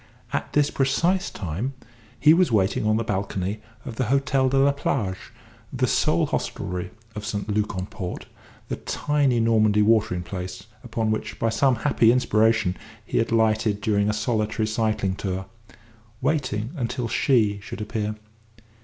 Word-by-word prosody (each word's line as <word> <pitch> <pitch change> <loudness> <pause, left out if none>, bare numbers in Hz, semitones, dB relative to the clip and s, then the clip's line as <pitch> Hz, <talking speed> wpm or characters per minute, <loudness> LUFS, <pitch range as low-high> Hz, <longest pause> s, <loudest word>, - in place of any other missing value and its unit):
At - - -2
this 145 -1 +3
precise 170 +8 +1
time 100 - -4 0.4
he 155 +1 +7
was 180 -4 +3
waiting 105 0 +2
on 110 0 +3
the 115 - 0
balcony 100 0 -2 0.2
of 115 -3 -7
the 130 - +1
Hôtel 135 +1 +2
de 135 - +1
la 140 +1 +5
Plage 110 -8 -2 0.4
the 130 -1 +1
sole 120 - +2
hostelry 90 +1 -3 0.2
of 105 0 -6
St. 105 -1 -3
Luc 105 -1 -1
en 95 - -2
Port, 90 -2 -6 0.4
the - - -3
tiny 145 -5 +1
Normandy 110 -2 +3
watering 105 -5 +2
place 90 +1 -6 0.2
upon 115 -2 -1
which, 110 - -3
by 115 - +1
some 130 +3 +3
happy 115 -2 +3
inspiration, 110 -5 +2 0.3
he - - 0
had 115 - 0
lighted 110 -2 +2
during 100 0 +1
a - - +3
solitary 110 0 0
cycling 110 -3 0
tour 95 -1 -3 0.7
waiting 130 -6 -1
until 125 -2 -2
She 110 -4 +2
should 110 - -8
appear. 105 0 -3
110 Hz, 155 wpm, -24 LUFS, 105-125 Hz, 0.7 s, he